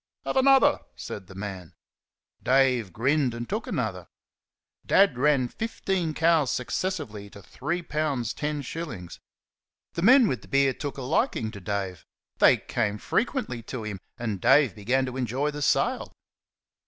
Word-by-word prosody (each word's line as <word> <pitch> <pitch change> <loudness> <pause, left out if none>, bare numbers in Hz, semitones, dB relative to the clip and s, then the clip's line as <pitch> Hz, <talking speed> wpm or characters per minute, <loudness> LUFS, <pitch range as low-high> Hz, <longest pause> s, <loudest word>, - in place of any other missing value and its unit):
"Have - - -2
another!" 270 +2 +5 0.2
said 95 -3 -7
the 95 - -13
man. 95 -4 -7 0.7
Dave 130 -6 +2
grinned, 130 - +1
and 120 0 -5
took - - -3
another. - - -3 0.8
Dad 195 -7 +4
ran 135 -1 +2
fifteen 190 - -2
cows, 160 -4 +3
successively, 125 - -3
to 100 -1 -13
three 170 - -4
pounds 145 -8 -1
ten 150 -1 -3
shillings. 115 - -7 0.7
The 170 - -3
men 245 +4 +7
with 125 - -2
the - - -15
beer 140 -1 +3
took 145 +2 -6
a 135 - -5
liking 110 -3 0
to 100 - -9
Dave. 95 -3 -4 0.3
They - - +6
came 105 -3 -2
frequently 225 - -1
to 115 +1 -6
him, 105 -3 -5 0.2
and 110 -6 -3
Dave 145 -4 +5
began 125 +5 0
to 130 0 -5
enjoy 130 +4 -1
the 150 0 -6
sale. - - +1
130 Hz, 150 wpm, -26 LUFS, 110-155 Hz, 0.8 s, men